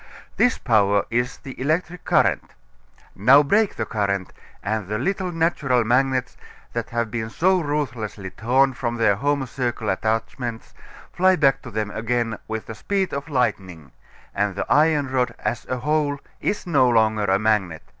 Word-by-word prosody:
This 245 - +3
power 100 -4 +2
is 120 +2 -1
the 130 -1 -10
electric 170 +5 -1
current. - - +1 0.6
Now 130 +9 +6
break 205 +8 +2
the - - -2
current, 100 -3 -2 0.3
and 105 -1 -2
the 105 +1 -2
little 190 - -1
natural 155 -7 +1
magnets, 130 +2 +1 0.4
that 115 -1 -3
have 115 -2 -2
been 110 -1 -3
so 185 +9 +2
ruthlessly 125 - -3
torn 130 +5 +2
from 120 -1 -3
their 115 -3 +3
home 140 +3 0
circle 120 -3 -3
attachments, 115 +3 -3 0.4
fly 185 +1 +4
back 140 -5 +3
to 130 - -9
them 110 -1 -3
again 115 0 -2
with 110 0 -4
the - - -7
speed 190 - -2
of 140 +2 -4
lightning, 95 - -2 0.4
and 100 -1 -1
the 100 - -2
iron 150 -2 +3
rod 130 -1 -1
as 120 +2 -3
a 130 - -1
whole 145 +2 0 0.2
is 205 - -2
no 140 -7 +3
longer 110 -2 +2
a 95 -1 +3
magnet. 95 -6 0
120 Hz, 160 wpm, -23 LUFS, 110-145 Hz, 0.6 s, Now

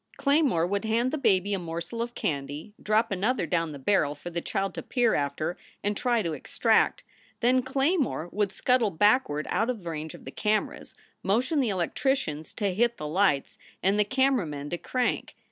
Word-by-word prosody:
Claymore 280 - +3
would 200 +3 -1
hand 230 +3 +1
the 310 - -1
baby 205 -5 +2
a 195 - 0
morsel 170 +6 -5
of 240 0 -4
candy, 145 +5 -3
drop 215 +1 +2
another 200 +2 0
down 165 0 0
the 145 - -7
barrel 145 0 +1
for 175 +4 -8
the 170 0 -2
child 195 +3 -2
to - - -5
peer 245 -3 +1
after 155 +4 -1 0.3
and 205 0 0
try 240 0 +1
to 165 -2 -2
extract. - - +1 0.4
Then 250 +2 +4
Claymore 270 - 0
would 205 -1 0
scuttle 250 0 +2
backward 190 - +2
out 225 +3 +1
of 230 -7 -3
the 170 - -4
range 155 0 -5
of - - -14
the - - -7
cameras, 215 0 -1 0.3
motion 250 +10 +1
the 255 -5 +2
electricians 180 - -1
to 200 -3 -1
hit 235 +4 +1
the 150 - -5
lights 155 -4 +1 0.2
and 195 +2 +3
the - - +6
camera 260 -2 +2
men 145 -1 -6
to 175 - -2
crank. 250 -1 -1
205 Hz, 190 wpm, -27 LUFS, 165-245 Hz, 0.4 s, the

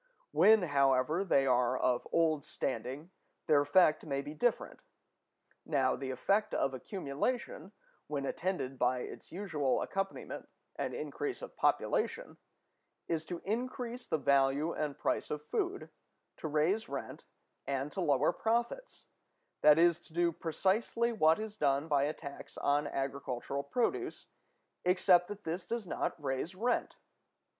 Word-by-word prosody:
When, 220 -2 +6
however, 140 +2 +2
they 140 -8 +3
are 125 -1 +3
of 125 -1 +1
old 160 -3 +2
standing, 135 +7 -4 0.3
their 150 -3 +5
effect 155 +2 +4
may 140 -2 -2
be 145 - -7
different. 240 +10 0 0.8
Now, 135 -4 +1
the 135 - -5
effect 195 +12 +1
of 135 - +1
accumulation, 195 - -3 0.4
when 140 -2 -2
attended 135 -6 -2
by 125 0 +2
its - - -9
usual 160 -8 0
accompaniment, 195 0 -4 0.3
an - - -3
increase 425 +2 -4
of - - -8
population, - - 0 0.7
is 165 -1 -1
to 175 +1 -6
increase 245 +2 -3
the 160 - +1
value 140 +2 +2
and 150 -2 -3
price - - -1
of 150 0 -4
food, 390 -2 -2 0.5
to - - -4
raise 160 +9 +1
rent, 140 -1 -6 0.4
and 140 +1 -2
to 190 - -3
lower 145 -1 +3
profits; 235 - -2 0.6
that 150 0 +7
is, 170 0 +4
to 160 - -19
do 170 0 +2
precisely 195 +9 0
what 160 -8 +4
is 215 -1 -6
done 140 -1 +1
by 145 -2 +3
a 150 - -1
tax 140 -3 -10
on 145 +1 +1
agricultural 135 -1 -3
produce, 230 - -2 0.5
except 180 -1 +4
that 205 0 -8
this 170 +3 -3
does 235 -2 -3
not 170 - -2
raise 140 +5 -3
rent. 240 +6 -1
155 Hz, 140 wpm, -33 LUFS, 140-195 Hz, 0.8 s, that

